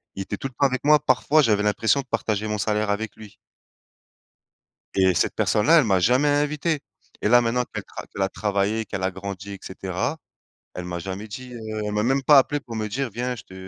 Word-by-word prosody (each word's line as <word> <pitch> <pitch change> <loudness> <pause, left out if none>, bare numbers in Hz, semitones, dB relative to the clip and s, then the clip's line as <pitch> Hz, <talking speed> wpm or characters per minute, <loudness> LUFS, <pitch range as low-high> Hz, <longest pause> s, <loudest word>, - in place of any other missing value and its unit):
il 95 - -3
était 100 - -5
tout 135 - -4
le 135 - -15
temps 140 - +2
avec 130 -1 0
moi, 150 +1 +6
parfois 145 +2 +3
j'avais 105 -6 +2
l'impression 110 +6 +2
de - - -16
partager 110 -3 -1
mon 105 0 -2
salaire 105 +1 0
avec 105 +1 -2
lui 110 -2 -13 1.6
et 95 -1 +4
cette - - 0
personne-là, 155 +11 +4
elle - - +4
m'a 95 -4 +3
jamais 125 +9 +3
invité, 150 +1 0 0.4
et - - +1
là, 120 +1 +7
maintenant 120 +1 +1
qu'elle - - -4
tra - - -9
qu'elle 100 - -7
a 95 - 0
travaillé, 105 +2 -1
qu'elle 95 - -5
a 95 - +1
grandi, 100 +1 -7
et 100 - -9
cetera, 95 - -3 0.6
elle 90 - -6
m'a 90 -1 -4
jamais 95 +4 -6
dit, 125 +4 -9
heu, 120 - -8 0.3
elle 105 - -2
m'a 105 0 0
même 135 +3 +1
pas 145 +1 +8
appelé 145 +2 0
pour 120 -4 -9
me 110 -1 -2
dire: 130 +5 -2
«Viens, 125 +3 -3
je 110 - -11
te - - -16
110 Hz, 230 wpm, -24 LUFS, 100-130 Hz, 1.6 s, pas